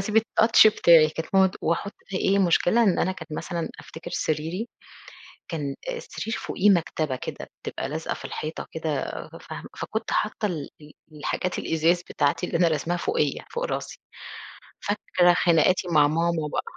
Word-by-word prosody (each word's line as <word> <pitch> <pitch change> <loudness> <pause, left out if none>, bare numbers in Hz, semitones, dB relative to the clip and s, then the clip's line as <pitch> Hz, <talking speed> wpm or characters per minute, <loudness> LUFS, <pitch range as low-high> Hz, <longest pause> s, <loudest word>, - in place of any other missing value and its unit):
اسيب 210 +3 +2
الtouch 225 0 +5
بتاعي 170 -7 +6
كانت 160 +1 -5
ماما 190 0 +7
تق 185 - -7
وأحط 170 +5 0 0.2
ف 195 - -6
إيه 195 +1 +2
مشكلة 190 +4 +3
إن 195 -5 +3
أنا 185 - +1
كنت 160 -4 -10
مثلًا 170 +2 -3
أفتكر 170 +2 -10
سريري 165 +10 -2 0.8
كان 145 -4 -3 0.2
السرير 230 - -5
فوقيه 205 +3 +1
مكتبة 160 -6 +1
كده - - -7 0.2
بتبقى - - -4
لازقة - - -3
في - - -9
الحيطة 155 +1 -5
كده 155 -4 -2 0.4
فاهمة - - -8
فكنت 220 +1 -4
حاطة 210 0 0
ال 160 -8 -3
ال 150 0 -13 0.2
الحاجات 155 +4 -3
الإزاز 165 +2 +1
بتاعتي 145 +4 +1
اللي - - -1
أنا 170 0 +4
راسماها 165 +2 0
فوقيّا 150 -4 -1
فوق 480 +1 -2
راسي، - - -4 0.8
فاكرة 185 -3 +2
خناقاتي 175 +1 +3
مع 150 -4 +5
ماما 165 0 0
بقى - - 0
170 Hz, 160 wpm, -25 LUFS, 155-195 Hz, 0.8 s, ماما